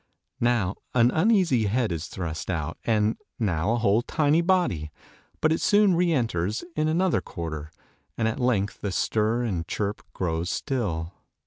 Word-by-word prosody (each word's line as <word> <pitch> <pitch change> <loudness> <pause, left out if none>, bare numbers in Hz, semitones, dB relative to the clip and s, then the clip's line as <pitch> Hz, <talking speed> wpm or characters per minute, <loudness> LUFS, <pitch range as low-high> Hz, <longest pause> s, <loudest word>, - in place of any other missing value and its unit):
Now, 115 -6 +1 0.2
an 120 0 +5
uneasy 165 - +3
head 115 0 0
is 80 -1 -3
thrust 85 -3 -5
out, 80 -3 -3
and 110 -1 +2 0.2
now 100 -5 0
a - - +1
whole 110 -1 +3
tiny 150 +4 +2
body; 170 - +1 0.5
but 155 - +3
it 160 - +1
soon 205 -2 +4
re 175 0 +2
enters 110 - 0
in 155 0 +1
another 175 +3 +2
quarter, 80 -4 -6 0.5
and 110 - +1
at 115 +5 -2
length 110 -5 0
the 100 - -2
stir 110 +5 +1
and 90 -8 -2
chirp 105 0 -2
grows 85 -1 -2
still. 95 - -2
110 Hz, 155 wpm, -26 LUFS, 90-145 Hz, 0.5 s, an